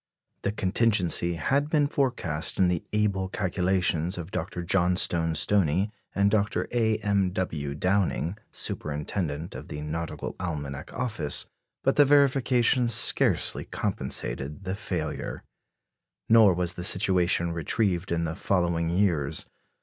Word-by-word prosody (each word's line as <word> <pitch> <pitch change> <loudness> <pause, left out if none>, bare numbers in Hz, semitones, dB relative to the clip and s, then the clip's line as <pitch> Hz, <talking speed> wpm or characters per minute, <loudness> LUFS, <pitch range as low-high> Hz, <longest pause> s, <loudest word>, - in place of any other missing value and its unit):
The 100 - -1
contingency 95 -4 +1
had 140 - 0
been 150 -2 +2
forecast 125 - -1
in 95 -2 +3
the 90 -2 -1
able 100 -3 0
calculations 90 -2 0
of 85 +1 -7
Dr. 90 - -4
Johnstone 85 -2 +2
Stoney 95 +2 +2 0.2
and 100 0 +3
Dr. 105 -1 0
A. 110 -3 +1
M. 100 -3 +1
W. 75 -7 -3
Downing, 90 +1 0
superintendent 75 +1 -3
of - - -9
the 75 - -6
Nautical 80 +2 -5
Almanac 70 -6 -5
Office; 110 - -2 0.4
but - - +1
the 145 - +7
verification 130 -3 +3
scarcely 115 - +4
compensated 75 +7 -3
the 95 0 -3
failure. 105 +3 -4 0.8
Nor 110 -5 +6
was 90 -1 -1
the 90 - -7
situation 90 -2 +2
retrieved 90 +3 -1
in 85 0 0
the 80 -1 -3
following 85 -4 0
years. 85 -6 0
90 Hz, 125 wpm, -26 LUFS, 85-105 Hz, 0.8 s, the